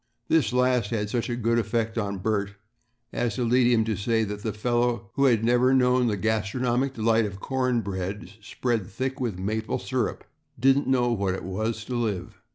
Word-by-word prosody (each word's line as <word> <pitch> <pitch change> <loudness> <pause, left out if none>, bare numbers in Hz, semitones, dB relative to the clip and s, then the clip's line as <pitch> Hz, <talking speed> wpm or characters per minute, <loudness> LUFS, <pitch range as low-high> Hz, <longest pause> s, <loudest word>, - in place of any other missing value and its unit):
This 155 -7 +3
last 125 -3 +2
had 105 -3 -2
such 120 0 -1
a 120 - -1
good 115 0 +1
effect 115 0 -1
on 100 -3 -2
Bert 100 0 -1 0.6
as 120 -4 -1
to 125 - -1
lead 120 +1 +3
him 110 -2 +3
to 110 -1 -1
say 110 +4 +1
that 105 -1 -5
the 110 - -2
fellow 120 0 -1
who 140 - +2
had 115 -4 +3
never 125 +2 +4
known 125 -1 +3
the 105 -3 0
gastronomic 120 +5 0
delight 115 0 +2
of 100 -1 -8
corn 130 0 0
bread 100 +1 -5
spread 115 -2 -2
thick 130 +6 -4
with 115 -7 -2
maple 110 +4 -2
syrup - - -2 0.4
didn't 135 +3 +3
know 125 -2 +2
what 100 -4 0
it - - -7
was 110 +4 -3
to 125 - -5
live. 110 -6 -3
115 Hz, 190 wpm, -26 LUFS, 105-125 Hz, 0.6 s, never